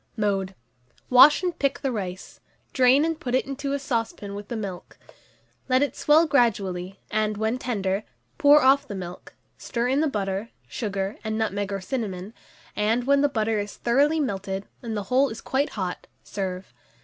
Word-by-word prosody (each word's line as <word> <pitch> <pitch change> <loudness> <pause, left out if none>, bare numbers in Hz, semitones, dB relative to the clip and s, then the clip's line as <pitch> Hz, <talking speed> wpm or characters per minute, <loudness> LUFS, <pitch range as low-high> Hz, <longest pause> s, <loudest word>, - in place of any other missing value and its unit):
Mode. 195 -3 -1 0.6
Wash 275 +7 +8
and 355 -2 -2
pick 275 -1 0
the 270 - -1
rice, 190 -5 -6 0.3
drain 260 +3 +5
and 325 -1 -2
put 250 -1 -2
it 260 - +1
into 275 +1 -4
a - - +1
saucepan 230 -6 -3
with 205 0 -7
the 235 - -4
milk; 195 -5 -6 0.7
let 255 +2 +4
it 285 - -2
swell 310 +3 +4
gradually, 195 - 0
and, 215 -1 0
when 220 +4 -1
tender, 200 -5 -1 0.4
pour 295 -2 +7
off 270 +2 +4
the 205 - -6
milk; 180 -2 -8 0.2
stir 240 0 -2
in 275 +3 +2
the 315 - +2
butter, 200 -3 -2 0.2
sugar, 200 -2 -3
and 220 0 -2
nutmeg 205 -2 -1
or 195 -1 -3
cinnamon, 200 -3 -4 0.4
and, 220 +4 +1
when 280 +2 +3
the 290 - +3
butter 220 -4 0
is 205 0 -5
thoroughly 285 +6 +2
melted, 195 -6 -3 0.2
and 225 -3 -4
the 205 - -2
whole 260 +7 +2
is 220 - -7
quite 275 +2 -1
hot, 185 -3 -4 0.2
serve. 185 -7 -5
220 Hz, 175 wpm, -25 LUFS, 195-270 Hz, 0.7 s, Wash